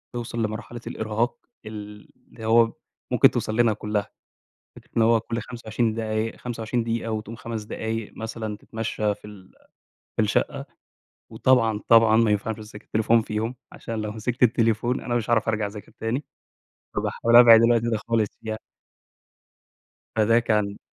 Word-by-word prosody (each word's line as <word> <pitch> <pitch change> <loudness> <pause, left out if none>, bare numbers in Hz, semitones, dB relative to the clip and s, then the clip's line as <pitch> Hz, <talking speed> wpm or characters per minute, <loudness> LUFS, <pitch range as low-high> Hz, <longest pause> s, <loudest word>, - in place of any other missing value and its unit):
توصَل 115 -1 -3
لمرحلة 110 +2 -5
الإرهاق 110 - -1 0.3
ال 105 -1 -9 0.2
اللي 110 - -10
هو 115 0 +4 0.4
ممكن - - +6
توصل 110 - -2
لنا 115 -1 +4
كلّها، 105 -1 -2 0.7
فكرة - - -16
إن - - +5
هو 115 0 +5
كل 115 +1 -4
25 115 -1 -2
دقايق، 110 0 -2
25 120 0 -3
دقيقة 115 0 -2
وتقوم 110 +1 -4
5 115 -1 -5
دقايق 110 +1 -4
مثلًا 110 -1 -5
تتمشّى 110 -1 -2
في - - -17
ال 100 -3 -14 0.6
في - - +3
الشقة - - 0 0.7
وطبعًا، 115 -5 +2
طبعًا 115 -1 +6
ما 115 -2 +4
ينفعش 110 +2 -1
تمسك 105 -1 -11
التليفون 115 +1 +2
فيهم، 110 +3 -3 0.2
عشان 115 -2 -5
لو 105 0 -3
مسكت 115 +3 -2
التليفون 120 +1 +2
أنا 120 - -2
مش 120 -2 -1
هاعرف 115 -2 +2
أرجع 110 -2 0
أذاكر 105 0 -10
تاني، 120 +6 -2 0.7
فباحاول 115 0 +2
أبعِد 115 -2 +9
الوقت 115 -1 +4
ده 115 -1 0
خالص 115 -3 +2
فيها. 110 -1 -4 1.6
فده 110 +1 +4
كان 105 -3 0
110 Hz, 150 wpm, -24 LUFS, 110-115 Hz, 1.6 s, أبعِد